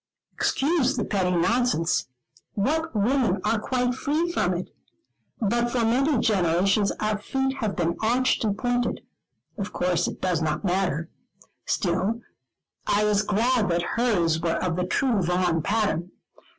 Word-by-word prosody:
Excuse 285 -2 +1
the 225 - 0
petty 190 -3 0
nonsense 180 -1 +1 0.5
what 315 +8 -1
women 220 -2 +2
are 225 - +2
quite 250 +2 0
free 305 +7 -1
from 180 - 0
it? 175 - -6 0.7
but 235 +2 +1
for 240 0 0
many 265 +5 +2
generations 195 -1 +2
our 215 0 -1
feet 265 +4 -2
have 215 -5 -2
been 170 +1 0
arched 245 +4 +2
and 205 -2 0
pointed: 245 +1 -1 0.6
of 200 - -3
course 180 -1 0
it - - -6
does 180 -3 0
not 155 +4 -1
matter; 175 -3 -1 0.6
still 190 +5 0 0.7
I 205 +1 +2
was 210 -1 +3
glad 215 +1 +1
that 170 0 +1
hers 180 -10 +2
were 165 -1 0
of 180 -3 -1
the 180 0 -1
true 235 0 +1
Vaughan 180 -1 +1
pattern. 195 -3 0
210 Hz, 145 wpm, -25 LUFS, 180-245 Hz, 0.7 s, was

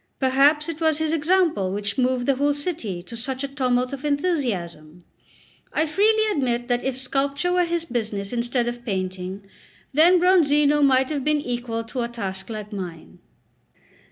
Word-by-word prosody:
Perhaps 280 +4 +3
it 330 -1 -6
was 315 -2 +2
his 315 0 -1
example 320 - +2
which 200 0 -3
moved 255 -1 +1
the 275 -1 +1
whole 285 +1 +1
city 265 - -4
to 235 - -10
such 260 +3 -4
a - - -1
tumult 255 -2 0
of 275 0 -6
enthusiasm. 215 - -2 0.7
I 310 - +1
freely 430 +7 +3
admit 245 -7 -1
that 245 0 +1
if 265 -1 -2
sculpture 275 +6 -1
were 360 -1 +3
his 340 -1 -2
business 215 -6 -3
instead 240 0 0
of 240 0 -5
painting, 185 -2 -4 0.5
then 335 +6 +6
Bronzino 295 -5 +4
might 265 0 +3
have 285 -3 -2
been 300 +1 +2
equal 240 -4 -3
a 230 - -12
to 245 -3 -2
task 195 -5 -6
like 215 -1 -6
mine. 165 - -8
260 Hz, 165 wpm, -23 LUFS, 225-300 Hz, 0.7 s, then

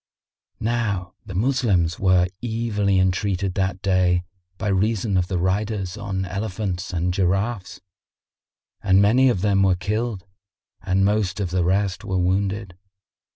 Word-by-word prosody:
[FN#59] - - -33
Now 105 -6 -1
the 95 - -7
Moslems 100 -7 +1
were 95 -2 +4 0.2
evilly 110 -4 0
entreated 95 0 0
that 95 0 -2
day 90 -2 +2 0.3
by 95 - -3
reason 100 +1 +1
of 90 -1 +2
the 90 - -2
riders 95 +1 -1
on 100 -3 -3
elephants 95 -1 -3
and 90 0 -1
giraffes,[FN#60] 95 +3 -1 1.1
and 95 +1 +6
many 120 +6 +5
of 100 -7 0
them 100 -1 +2
were 95 -2 +4
killed 105 +2 -3 0.6
and 95 0 +1
most 100 -2 0
of 95 -4 -2
the 90 -1 +1
rest 95 +1 0
were 95 -2 -2
wounded. 95 +1 -1
95 Hz, 140 wpm, -23 LUFS, 90-105 Hz, 1.1 s, and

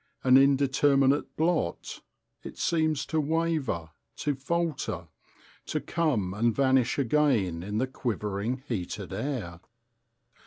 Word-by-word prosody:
An 130 -1 +5
indeterminate 140 0 +3
blot, 160 - -1 0.4
it - - -9
seems 155 -3 +1
to 160 -1 0
waver, 150 - -1 0.2
to 145 - -1
falter, 135 - -2 0.6
to - - -1
come 125 - -1
and 115 +2 +1
vanish 130 -3 +2
again 120 - +1
in 105 +4 -4
the 125 - +2
quivering, 115 -1 -3
heated 95 -8 -4
air. 115 - -4
130 Hz, 110 wpm, -28 LUFS, 105-150 Hz, 0.6 s, An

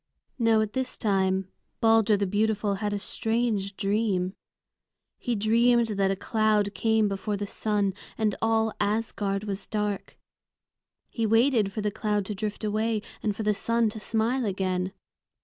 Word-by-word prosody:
Now 225 -2 +4
at 215 -1 -2
this 260 -1 -2
time 190 -3 +1 0.3
Balder 225 -2 +4
the 200 - 0
beautiful 210 +1 +1
had 210 -1 0
a 205 - -1
strange 215 -2 -1
dream. 195 -3 0 0.9
He 245 - -1
dreamed 230 +2 +3
that 195 -2 +1
a 195 - +1
cloud 215 0 +1
came 220 +2 +2
before 200 +1 -2
the 205 - -3
sun, 205 -1 0 0.2
and 215 -2 +1
all 225 -1 +2
Asgard 205 -1 -1
was 200 -2 -5
dark. 210 -2 -3 0.9
He 230 -2 -1
waited 225 -2 +3
for 215 - -4
the 210 0 -1
cloud 210 -1 -1
to 210 - -4
drift 210 +2 -4
away, 215 0 0 0.2
and 210 -2 -1
for 220 - -4
the 210 0 +2
sun 230 +2 +1
to 220 +1 -7
smile 230 +4 0
again. 185 -2 -1
210 Hz, 155 wpm, -27 LUFS, 200-225 Hz, 0.9 s, Now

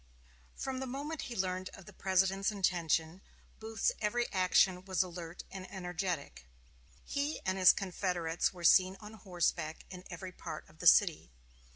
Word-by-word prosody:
From 265 -1 -4
the 265 - -4
moment 285 +5 -4
he 240 - -6
learned 185 -1 -2
of 195 - -13
the - - -13
President's 195 +1 +1
intention, 175 -3 0 0.4
Booth's 220 -2 0
every 240 +3 +1
action 185 0 +3
was 190 -2 +1
alert 175 -1 -8
and 190 -1 -8
energetic. 175 - -4 0.6
He 285 +2 -2
and 185 - +1
his 185 -1 +8
confederates 180 -3 -1
were 175 -2 -11
seen 185 +2 +5
on 210 0 -10
horseback 175 -5 -2
in 180 -1 -9
every 185 +1 -7
part 160 -3 -8
of 155 - -21
the 180 - +1
city. 170 - +5
185 Hz, 155 wpm, -33 LUFS, 175-195 Hz, 0.6 s, his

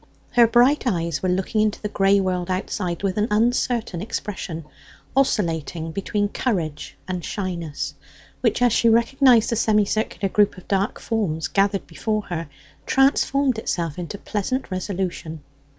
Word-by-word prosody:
Her 240 -1 +6
bright 250 +4 +4
eyes 170 -7 -1
were 185 - 0
looking 190 +4 0
into 215 -1 +1
the 210 - -3
grey 200 -1 +3
world 185 -2 -1
outside 185 -1 -2
with 195 -1 -1
an 210 - +2
uncertain 225 -3 +1
expression, 190 -6 -5 0.5
oscillating 165 - 0
between 205 +3 -1
courage 165 - -2
and 180 -2 -3
shyness, 170 -7 -4 0.5
which, - - +2
as 245 -3 +4
she 230 - +4
recognized 235 0 +4
the - - +1
semicircular 215 -1 +1
group 205 0 +2
of 185 - -13
dark 200 +1 0
forms 190 -9 -1
gathered 195 0 +1
before 215 -1 -2
her, 165 -3 -4 0.4
transformed 270 -2 +3
itself 170 -7 -2
into 175 +3 -5
pleasant 215 +5 -3
resolution. 180 -4 -4
200 Hz, 140 wpm, -23 LUFS, 175-225 Hz, 0.5 s, Her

